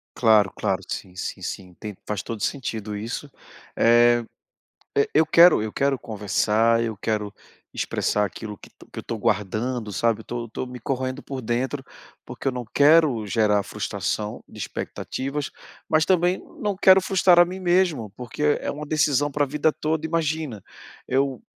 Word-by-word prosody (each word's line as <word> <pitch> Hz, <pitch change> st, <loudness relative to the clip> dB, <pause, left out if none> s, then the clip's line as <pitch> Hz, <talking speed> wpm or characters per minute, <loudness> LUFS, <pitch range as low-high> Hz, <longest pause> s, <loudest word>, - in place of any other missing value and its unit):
Claro, 110 Hz, -4 st, +4 dB
claro, 95 Hz, 0 st, -1 dB
sim, 90 Hz, -2 st, -6 dB
sim, 95 Hz, -, -5 dB
sim. 90 Hz, -2 st, -6 dB
Tem, 105 Hz, -2 st, -7 dB
faz 105 Hz, -1 st, -3 dB
todo 115 Hz, -2 st, -5 dB
o -, -, -5 dB
sentido 110 Hz, -6 st, -3 dB
isso. 115 Hz, +7 st, -5 dB, 0.5 s
Eh, 120 Hz, 0 st, +5 dB, 0.7 s
eu 140 Hz, -, +4 dB
eu 160 Hz, +1 st, +5 dB
quero 170 Hz, -8 st, +7 dB
eu 110 Hz, -1 st, -4 dB
quero 140 Hz, -1 st, +1 dB
conversar, 110 Hz, +2 st, +1 dB
eu 115 Hz, -2 st, -3 dB
quero 105 Hz, 0 st, -2 dB, 0.4 s
expressar 105 Hz, -, 0 dB
aquilo 105 Hz, +2 st, -6 dB
que -, -, -15 dB, 0.3 s
eu -, -, -4 dB
tô 115 Hz, -, -5 dB
guardando, 110 Hz, +3 st, -1 dB
sabe, 115 Hz, +2 st, +1 dB
eu -, -, -11 dB
tô 120 Hz, -1 st, -5 dB
tô 115 Hz, -, -4 dB
me 125 Hz, 0 st, -9 dB
corroendo 130 Hz, +2 st, -3 dB
por 135 Hz, -2 st, -6 dB
dentro, 130 Hz, +4 st, -2 dB, 0.4 s
porque -, -, -9 dB
eu 135 Hz, -, +2 dB
não 125 Hz, -1 st, -5 dB
quero 145 Hz, -6 st, +4 dB
gerar 105 Hz, -1 st, +2 dB
frustração 105 Hz, 0 st, -3 dB
de -, -, -13 dB
expectativas, 140 Hz, +2 st, -4 dB, 0.4 s
mas 155 Hz, 0 st, +3 dB
também 180 Hz, 0 st, +2 dB, 0.2 s
não 205 Hz, -5 st, -1 dB
quero 190 Hz, 0 st, +7 dB
frustrar 185 Hz, -2 st, +4 dB
a -, -, +8 dB
mim 180 Hz, +2 st, -6 dB
mesmo, 175 Hz, -, +1 dB
porque 125 Hz, +4 st, -5 dB
é 150 Hz, -1 st, +1 dB
é -, -, 0 dB
uma 150 Hz, +1 st, -6 dB
decisão 145 Hz, -1 st, +2 dB
pra 145 Hz, -, +1 dB
a -, -, -6 dB
vida 150 Hz, +2 st, +1 dB
toda. 155 Hz, +1 st, -2 dB
Imagina, 155 Hz, -, -2 dB, 0.5 s
eu 135 Hz, 0 st, 0 dB
125 Hz, 170 wpm, -24 LUFS, 110-150 Hz, 0.7 s, a